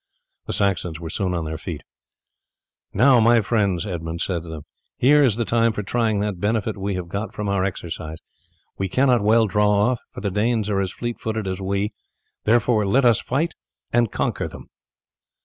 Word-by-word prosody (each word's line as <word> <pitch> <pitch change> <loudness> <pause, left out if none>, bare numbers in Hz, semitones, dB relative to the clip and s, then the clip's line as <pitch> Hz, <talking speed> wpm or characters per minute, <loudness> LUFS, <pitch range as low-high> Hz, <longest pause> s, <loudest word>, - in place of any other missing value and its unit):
The - - -2
Saxons 90 -5 0
were 80 -1 -6
soon 90 -1 -1
on 85 -2 -2
their 80 0 -5
feet. - - -6 1.1
"Now, 125 +4 +5
my 115 +1 +5
friends," 100 -5 0
Edmund 85 -3 -4
said 90 -3 -1
to 85 - -11
them, 80 -2 -7 0.3
"here 145 +3 +5
is 120 -7 +3
the 115 0 -1
time 115 0 +2
for 105 - -3
trying 110 0 0
what 100 -3 -2
benefit 110 +2 0
we 100 -1 -3
have 90 -2 -4
got 100 +5 -5
from 105 -1 -3
our 100 -1 +1
exercise. 80 -4 -4 0.6
We 95 -1 -1
cannot 125 +2 +3
well 110 +2 +4
draw 105 0 +2
off, 105 +4 +2
for - - -8
the 100 -1 -1
Danes 110 +1 0
are 100 - +1
as 95 -2 -1
fleet 120 -1 -5
footed 110 -1 -3
as 95 +1 -3
we; 100 +2 -1 0.5
therefore 115 0 +3
let 125 +6 +3
us 120 -1 +4
fight 160 +6 -1 0.4
and 120 -2 +3
conquer - - -1
them." - - -12
105 Hz, 190 wpm, -22 LUFS, 95-115 Hz, 1.1 s, Now